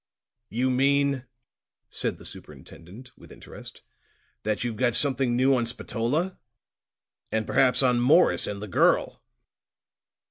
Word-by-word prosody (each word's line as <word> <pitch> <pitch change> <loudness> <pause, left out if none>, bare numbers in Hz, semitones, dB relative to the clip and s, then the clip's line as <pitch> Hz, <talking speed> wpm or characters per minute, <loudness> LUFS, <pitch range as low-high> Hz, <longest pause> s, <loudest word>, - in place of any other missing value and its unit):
"You 125 +5 0
mean," 140 0 +1 0.7
said - - -1
the - - -13
superintendent 105 +10 -11
with - - -17
interest, - - -12 0.6
"that 110 +1 -2
you've 120 -2 -3
got 120 0 +1
something 135 -3 +1
new 130 +2 +3
on 120 -2 -1
Spatola 125 +10 -2 0.9
and 110 -1 -1
perhaps 130 +3 +2
on 125 -2 +3
Morris 150 +9 +4
and 100 0 -5
the - - -6
girl!" 90 - +1
125 Hz, 120 wpm, -25 LUFS, 115-135 Hz, 0.9 s, Morris